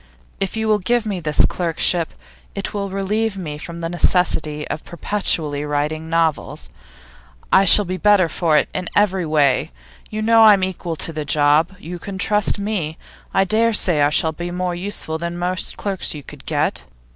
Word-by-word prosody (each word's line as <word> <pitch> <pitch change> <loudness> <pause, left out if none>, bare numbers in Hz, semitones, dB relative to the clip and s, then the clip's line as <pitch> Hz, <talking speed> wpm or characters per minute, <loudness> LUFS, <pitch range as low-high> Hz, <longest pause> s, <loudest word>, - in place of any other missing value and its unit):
If 195 +2 -3
you 220 0 -1
will 215 -1 +3
give 235 +4 0
me 200 -4 -3
this 150 -3 +2
clerkship, 170 0 0 0.4
it 200 - -4
will 200 -1 -3
relieve 200 +2 -1
me 150 -5 -6
from 170 +2 -8
the 165 - -2
necessity 160 -4 +1
of 155 - -5
perpetually 160 -5 -1
writing 150 +2 -2
novels; 160 - -1 0.8
I 195 - +6
shall 205 +2 +6
be 185 +1 -3
better 200 -1 +4
for 160 -2 +1
it - - +2
in 180 - -4
every 190 -4 +2
way. 145 -4 +2 0.4
You 215 0 -4
know 225 +1 +5
that - - +8
I'm 195 -2 +1
equal 175 -3 -3
to 165 - -3
the 155 -1 -3
job; 150 +5 +2
you 175 -1 -8
can 195 +1 -7
trust 210 +3 +2
me; 200 -6 -3 0.3
and 195 - +2
I - - +5
dare 225 +4 +2
say 175 -7 +1
I 145 - +4
shall 160 +2 +2
be 175 +3 -6
more 180 0 -2
useful 175 -3 -3
than 170 +1 -4
most 180 +1 -2
clerks 195 -5 -2
you 145 - -8
could - - -13
get. - - -1
175 Hz, 190 wpm, -20 LUFS, 160-200 Hz, 0.8 s, that